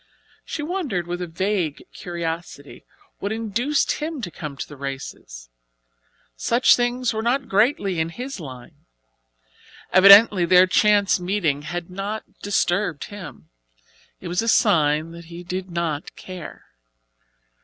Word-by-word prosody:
She 295 Hz, -, -5 dB
wondered 295 Hz, -, -2 dB
with 175 Hz, +1 st, -4 dB
a 180 Hz, -, -3 dB
vague 175 Hz, -2 st, -2 dB
curiosity 165 Hz, -4 st, -6 dB, 0.3 s
what 200 Hz, -, -3 dB
induced 230 Hz, +6 st, 0 dB
him 310 Hz, -1 st, -3 dB
to 175 Hz, -, -4 dB
come 150 Hz, -4 st, -7 dB
to -, -, -5 dB
the 145 Hz, -, -11 dB
races. 130 Hz, -, -8 dB, 0.8 s
Such 235 Hz, +2 st, +4 dB
things 245 Hz, 0 st, 0 dB
were 220 Hz, -, -2 dB
not 255 Hz, +3 st, 0 dB
greatly 200 Hz, -, +1 dB
in 160 Hz, +1 st, 0 dB
his 250 Hz, +7 st, -7 dB
line. 130 Hz, -6 st, -11 dB, 1.1 s
Evidently 200 Hz, 0 st, +8 dB
their 180 Hz, +2 st, +6 dB
chance 205 Hz, +1 st, +3 dB
meeting 175 Hz, -6 st, -1 dB
had 170 Hz, +4 st, -6 dB
not 200 Hz, +3 st, -4 dB, 0.2 s
disturbed 180 Hz, -4 st, 0 dB
him. 145 Hz, -, -10 dB, 0.7 s
It 185 Hz, -, -8 dB
was 175 Hz, +3 st, 0 dB
a 230 Hz, -, -4 dB
sign 160 Hz, -8 st, +3 dB
that 170 Hz, 0 st, -11 dB
he 170 Hz, +1 st, -10 dB
did 185 Hz, +1 st, -5 dB
not 170 Hz, -3 st, -3 dB
care. 185 Hz, -3 st, -10 dB
180 Hz, 135 wpm, -22 LUFS, 165-210 Hz, 1.1 s, Evidently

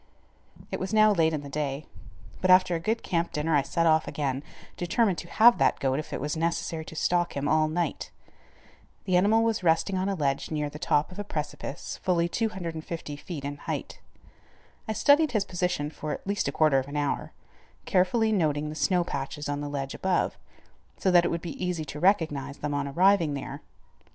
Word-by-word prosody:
It -, -, -3 dB
was 195 Hz, +3 st, -2 dB
now 215 Hz, 0 st, +6 dB
late 165 Hz, -4 st, +3 dB
in 150 Hz, -2 st, -3 dB
the -, -, -7 dB
day, 140 Hz, 0 st, -3 dB, 0.6 s
but 185 Hz, -, +1 dB
after 185 Hz, -1 st, +6 dB
a 165 Hz, -, 0 dB
good 220 Hz, +7 st, -1 dB
camp 170 Hz, -2 st, -1 dB
dinner 155 Hz, 0 st, 0 dB
I 145 Hz, -, +4 dB
set 165 Hz, +5 st, 0 dB
off 160 Hz, -1 st, +3 dB
again, 135 Hz, -3 st, -2 dB, 0.3 s
determined 180 Hz, 0 st, +1 dB
to 170 Hz, -, -8 dB
have 235 Hz, +5 st, +6 dB
that -, -, +3 dB
goat 135 Hz, +1 st, 0 dB
if 155 Hz, -, -7 dB
it -, -, -3 dB
was 150 Hz, +2 st, -2 dB
necessary 165 Hz, 0 st, -2 dB
to 160 Hz, -, -10 dB
stalk 175 Hz, 0 st, 0 dB
him 140 Hz, +1 st, -1 dB
all 155 Hz, +1 st, +3 dB
night. 165 Hz, -1 st, -2 dB, 1.0 s
The 185 Hz, -, +1 dB
animal 210 Hz, +5 st, +4 dB
was 225 Hz, -3 st, 0 dB
resting 175 Hz, +3 st, +2 dB
on 190 Hz, +2 st, 0 dB
a 195 Hz, -, -1 dB
ledge 140 Hz, -5 st, -1 dB
near 150 Hz, -2 st, -2 dB
the 150 Hz, -, -9 dB
top 150 Hz, +3 st, +1 dB
of 180 Hz, -, -10 dB
a -, -, -2 dB
precipice 150 Hz, -4 st, -5 dB
fully 170 Hz, -2 st, +2 dB
250 170 Hz, -7 st, -4 dB
feet 145 Hz, -1 st, -7 dB
in 145 Hz, 0 st, -4 dB
height. -, -, -5 dB, 0.9 s
I 220 Hz, -, -1 dB
studied 290 Hz, +4 st, +4 dB
his 210 Hz, -3 st, +1 dB
position 180 Hz, -5 st, -2 dB
for 155 Hz, -1 st, -5 dB
at -, -, -5 dB
least 200 Hz, +1 st, -1 dB
a -, -, 0 dB
quarter 155 Hz, -4 st, +3 dB
of 130 Hz, -, -5 dB
an 145 Hz, +1 st, -5 dB
hour, 145 Hz, -1 st, -1 dB, 0.5 s
carefully 220 Hz, +5 st, +2 dB
noting 150 Hz, -6 st, +1 dB
the 155 Hz, -, -6 dB
snow 180 Hz, +3 st, +2 dB
patches 140 Hz, -2 st, -5 dB
on 145 Hz, 0 st, -2 dB
the 145 Hz, -, -4 dB
ledge 135 Hz, -1 st, -4 dB
above, 185 Hz, -1 st, 0 dB, 0.6 s
so 190 Hz, -, +1 dB
that 175 Hz, -1 st, +6 dB
it -, -, +1 dB
would 170 Hz, -, -2 dB
be 175 Hz, +2 st, -6 dB
easy 175 Hz, -3 st, -2 dB
to 150 Hz, +1 st, -7 dB
recognize 150 Hz, -7 st, +1 dB
them 145 Hz, 0 st, -3 dB
on 140 Hz, 0 st, -1 dB
arriving 170 Hz, 0 st, +3 dB
there. 140 Hz, -, -6 dB
165 Hz, 205 wpm, -27 LUFS, 145-185 Hz, 1.0 s, now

